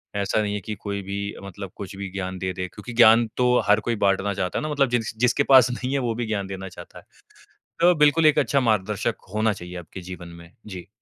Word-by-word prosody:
ऐसा 100 +2 0
नहीं 105 -1 -2
है 105 - -2
कि 105 - -5
कोई 100 -1 -4
भी 100 +1 -5 0.3
मतलब 100 -1 -8
कुछ 100 -1 -8
भी 100 -1 -5
ज्ञान 95 -1 -4
दे 95 0 -2
दे, 90 0 -4
क्योंकि 120 +6 -10
ज्ञान 115 0 +6
तो 125 - +2 0.2
हर 105 +1 +5
कोई 120 - +1
बाँटना 100 +1 +1
चाहता 95 -1 -2
है - - -5
ना 155 - -3
मतलब 140 -3 +1
जिस 120 -3 -1
जिसके 125 +3 +3
पास 130 -3 +6
नहीं 125 +1 -4
है, 140 - +1
वो 120 -3 -1
भी 120 +1 -3
ज्ञान 100 -3 -2
देना 95 0 -6
चाहता - - -12
है। - - -20 0.7
तो 175 +1 +5
बिल्कुल 150 +2 +4
एक 155 - +5
अच्छा 140 - +2
मार्गदर्शक 105 -4 -1
होना 110 0 +1
चाहिए 90 -1 -9
आपके 85 +3 -10
जीवन 85 -1 -8
में। 85 0 -15 0.2
जी। 90 -2 -8
105 Hz, 240 wpm, -24 LUFS, 95-120 Hz, 0.7 s, ज्ञान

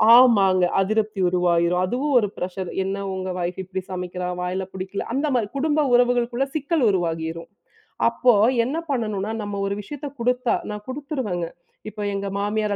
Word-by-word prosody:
ஆமாங்க. 195 -7 +6
அதிருப்தி 215 0 0
உருவாயிரும் 175 0 +2
அதுவும் 270 +8 -1
ஒரு 210 - 0
பிரஷர் 185 0 -4
"என்ன 195 +1 -2 0.2
உங்க 190 0 -4
ஒய்ஃப் 175 +2 -3
இப்படி 190 +1 -4
சமைக்கிறா? 180 0 -4
வாயில 185 +1 -2
புடிக்கல." 190 +1 -4
அந்த 290 +3 0
மாரி, 225 -4 +1
குடும்ப 305 +1 +2
உறவுகளுக்குள்ள 245 +1 +3
சிக்கல் 300 0 0
உருவாகிரும். 165 -3 -2 0.6
அப்போ, 245 +1 +3 0.3
என்ன 290 +6 -2
பண்ணனும்னா, 215 -4 -1
நம்ம 205 -1 -4
ஒரு 200 - -1
விஷயத்தை 290 +6 -7
குடுத்தா 250 0 +1 0.2
நான் 210 0 -7
குடுத்துருவேங்க. 260 - -3 0.4
இப்போ 210 - -7
எங்க 200 0 -3
மாமியார் 210 0 0
205 Hz, 145 wpm, -23 LUFS, 185-245 Hz, 0.6 s, ஆமாங்க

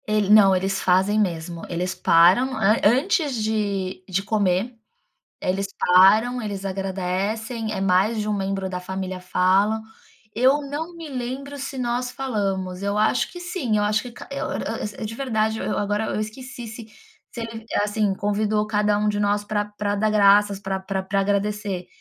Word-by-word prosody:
Ele 215 -2 +1
não, 205 -3 +7
eles 195 +1 -1
fazem 190 +4 +3
mesmo. 170 -3 -2
Eles 180 +2 -2
param 185 +9 +4
an 215 +1 +3
antes 285 - +2
de 200 -4 -2
de 190 +1 0
comer, 205 +2 0 0.7
eles 195 +2 -1
param, 215 +7 +5
eles 200 -2 -5
agradecem, 195 +4 -2
eh, 195 - -3
mais 195 +4 +2
de 210 - -3
um 210 - +1
membro 195 -1 -2
da 180 -1 -4
família 185 0 -5
falam. 190 +4 +2 0.5
Eu 260 +5 +4
não 300 +5 -5
me 330 -2 -8
lembro 265 +2 -5
se 275 0 -5
nós 245 0 -1
falamos, 195 -8 -3
eu 200 +1 -1
acho 215 +3 +1
que 355 - -8
sim, 325 - -1
eu - - +1
acho 210 0 +1
que 245 - -9
ca - - -11
eu 275 - -3
eu - - -3 0.4
eu, 225 - -3
de 220 - -6
verdade, 220 -4 -1
eu - - -2
agora 205 +1 0
eu - - -2
esqueci 240 +3 -7
se 225 0 -9 0.5
ele, 225 -1 -6 0.2
assim, 210 -1 0
convidou 210 +1 0
cada 210 -1 +1
um 210 0 +1
de 205 0 0
nós 205 0 +1
pra 205 0 -1
pra 205 0 -3
dar 215 +1 +1
graças, 205 -1 +4
pra 195 -1 -3
pra 190 0 -3
pra 195 +1 0
agradecer, 200 -2 -1
210 Hz, 175 wpm, -23 LUFS, 195-225 Hz, 0.7 s, não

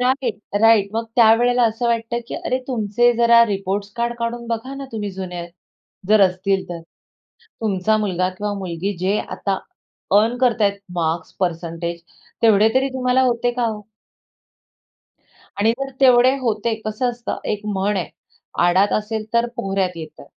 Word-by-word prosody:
Right, 250 -3 0 0.2
right. 225 -3 +5
मग 225 +1 -1
त्यावेळेला 240 +2 +5
असं 225 +2 -3
वाटतं, 235 0 0
की - - -5
अरे 255 - -2
तुमचे 240 0 +2
जरा 235 0 +6
रिपोर्टस 200 0 -3
कार्ड 235 0 -1
काढून 235 0 -3
बघा 235 +4 -3
ना, 275 0 -6
तुम्ही 210 -2 -3
जुने, 180 -2 -6 0.6
जर 215 -1 +5
असतील 190 +1 -1
तर. 175 -1 -6 0.8
तुमचा 215 0 +1
मुलगा 185 -3 0
किंवा 205 0 -2
मुलगी 185 +2 -3
जे 190 +4 0
आता 195 -1 -3 0.6
अर्न 230 +3 +1
करत 240 -3 +2
आहेत 200 -1 +2 0.2
मार्क्स, 165 0 -2
परसेंटेज, 170 -1 -3 0.4
तेवढे 220 -1 +5
तरी 265 +1 +2
तुम्हाला 255 0 +2
होते 240 +1 0
का 240 -1 -1
हो? 215 -2 -3 1.8
आणि 220 +2 +3
जर 275 0 -3
तेवढे 255 0 +6
होते, 225 -2 0
कसं 215 +3 -1
असतं 240 -1 -5
एक 210 0 -5
म्हण 205 0 0
आहे, 180 - -2 0.6
"आडात 190 +3 +3
असेलतर 220 +2 -1
पोहऱ्यात 195 -2 -1
येतं." 155 -3 -9
215 Hz, 145 wpm, -20 LUFS, 195-235 Hz, 1.8 s, जरा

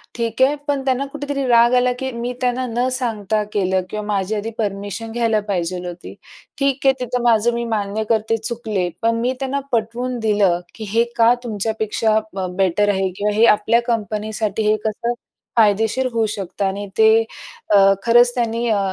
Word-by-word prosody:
ठीक 230 +1 -2
आहे. 280 +3 +4
पण 280 -2 0
त्यांना 265 +1 +1
कुठेतरी 280 -1 -4
राग 235 0 +5
आला, 250 0 +3
की 265 0 -2
मी 235 +1 -4
त्यांना 250 +1 0
न 240 +2 0
सांगता 220 -4 -1
केलं 190 -2 +1
किंवा 210 0 -4
माझी 205 0 -1
आधी 210 +2 -3
परमिशन 205 +1 -4
घ्यायला 225 -2 +1
पाहिजेल 180 -1 -2
होती, 175 0 -8 0.4
ठीक 275 -1 0
आहे. 270 - +6
तिथं 250 0 -2
माझं 235 0 +3
मी 235 0 -2
मान्य 210 +1 -1
करते, 225 0 +1
चुकले, 220 -5 -3
पण 230 0 +2
मी 250 +2 0
त्यांना 270 +1 -1
पटवून 240 +2 -1
दिलं, 205 -5 +2 0.2
की 220 - -7
हे 230 +1 +4
का 230 +1 +6
तुमच्यापेक्षा 220 0 0 0.4
बेटर 195 +2 +2
आहे? 190 -1 +1
किंवा 205 0 0
हे 225 +2 +5
आपल्या 220 +2 +4
कंपनीसाठी 215 -1 -2
हे 215 - +4
कसं 235 +3 -1 0.4
फायदेशीर 220 +4 +3
होऊ 225 -1 +2
शकतं 195 +1 -3
आणि 200 +1 -3
ते 220 0 +6 0.7
अ, 195 0 +6
खरंच 240 +1 +5
त्यांनी 235 0 -1
अ, 210 -2 +2
225 Hz, 170 wpm, -20 LUFS, 205-240 Hz, 0.7 s, आहे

